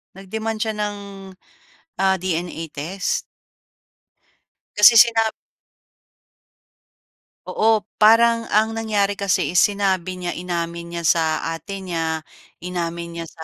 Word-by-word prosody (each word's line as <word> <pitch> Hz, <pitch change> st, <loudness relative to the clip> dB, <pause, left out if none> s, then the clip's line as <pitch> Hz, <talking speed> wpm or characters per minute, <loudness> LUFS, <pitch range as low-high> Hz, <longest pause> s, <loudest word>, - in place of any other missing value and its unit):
Nag-demand 220 Hz, +3 st, -5 dB
siya 220 Hz, 0 st, -1 dB
ng, 210 Hz, -1 st, -2 dB, 1.0 s
ah, 190 Hz, 0 st, +3 dB
DNA 175 Hz, -2 st, -3 dB
test. 175 Hz, +7 st, -2 dB, 1.5 s
Kasi 210 Hz, +3 st, +8 dB
sinab 225 Hz, -2 st, +4 dB, 2.1 s
Oo, 220 Hz, -1 st, +1 dB, 0.2 s
parang 230 Hz, +1 st, +5 dB
ang 220 Hz, +2 st, +2 dB
nangyari 210 Hz, -3 st, 0 dB
kasi, 200 Hz, -3 st, 0 dB
eh, -, -, +1 dB
sinabi 190 Hz, -3 st, +1 dB
niya 180 Hz, -1 st, -4 dB
inamin 170 Hz, -1 st, -4 dB
niya 170 Hz, -, -4 dB
sa 165 Hz, +1 st, +3 dB, 0.3 s
ate 195 Hz, +4 st, -7 dB
niya, 165 Hz, -3 st, -2 dB, 0.4 s
inamin 170 Hz, -1 st, -4 dB
niya -, -, -5 dB
sa 160 Hz, -, -11 dB
190 Hz, 105 wpm, -21 LUFS, 170-215 Hz, 2.1 s, Kasi